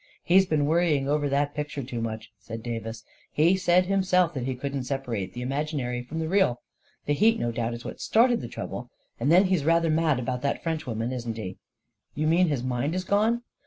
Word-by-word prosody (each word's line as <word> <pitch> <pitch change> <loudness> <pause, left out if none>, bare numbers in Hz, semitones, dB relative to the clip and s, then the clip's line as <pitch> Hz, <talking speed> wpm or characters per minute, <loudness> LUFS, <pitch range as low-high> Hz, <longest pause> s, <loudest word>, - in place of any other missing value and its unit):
" - - -36
He 175 - 0
has 190 0 +6
been 150 -3 +1
worrying 155 -3 +2
over 145 0 +1
that 145 +1 +1
picture 150 -2 -4
too 120 -2 -5
much," 110 -1 -5
said 115 0 -8
Davis. 115 -1 -5 0.3
u 150 - +3
He 180 +3 +5
said 180 -1 +3
himself 185 -2 +2
that 130 -4 -3
he 130 - -1
couldn't 135 0 -4
separate 120 -9 -3
the 125 - -4
imaginary 135 -2 -2
from 125 +6 -7
the 160 -1 -1
real. 170 -10 +2 0.5
The 145 - +1
heat 225 +8 +3
no 120 - -1
doubt 115 0 -2
is 120 - -10
what - - -7
started 235 +1 +3
the - - -5
trouble. 125 0 -6 0.3
And 135 +6 +1
then 180 +3 +7
he's 185 -6 +1
rather 165 +1 +3
mad 155 -4 +2
about 125 0 -3
that 140 - -1
Frenchwoman, 125 -8 -2
isn't 120 -3 -4
he?" 95 -4 -6 0.6
44 - - -8
You 155 - +1
mean 175 +3 +4
his 140 -6 -1
mind 130 +5 -1
is 185 - -1
gone 220 +5 +1
145 Hz, 225 wpm, -26 LUFS, 120-170 Hz, 0.6 s, then